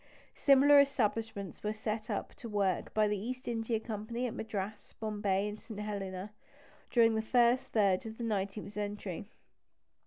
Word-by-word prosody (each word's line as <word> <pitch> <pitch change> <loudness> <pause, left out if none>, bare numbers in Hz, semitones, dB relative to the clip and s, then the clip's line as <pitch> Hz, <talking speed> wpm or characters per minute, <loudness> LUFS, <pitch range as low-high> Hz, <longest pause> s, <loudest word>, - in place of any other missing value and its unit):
Similar 280 +1 +6
establishments 225 -7 0
were 210 0 -1
set 215 0 -3 0.3
to 235 - -7
work 200 -3 0
by 215 -1 +3
the 205 -1 0
East 250 +5 -5
India 225 -1 0
Company 225 +2 -4
at 240 - -2
Madras, 210 -1 -5
Bombay, 205 -2 0
and 210 0 -6
St. 220 -4 -9
Helena, 200 -2 -4 0.6
during 230 -2 +5
the 220 - +1
first 240 +2 +3
third 200 -2 +2
of 220 0 -8
the 240 - -5
nineteenth 205 -2 -2
century. 205 -3 -4
215 Hz, 150 wpm, -32 LUFS, 205-230 Hz, 0.6 s, Similar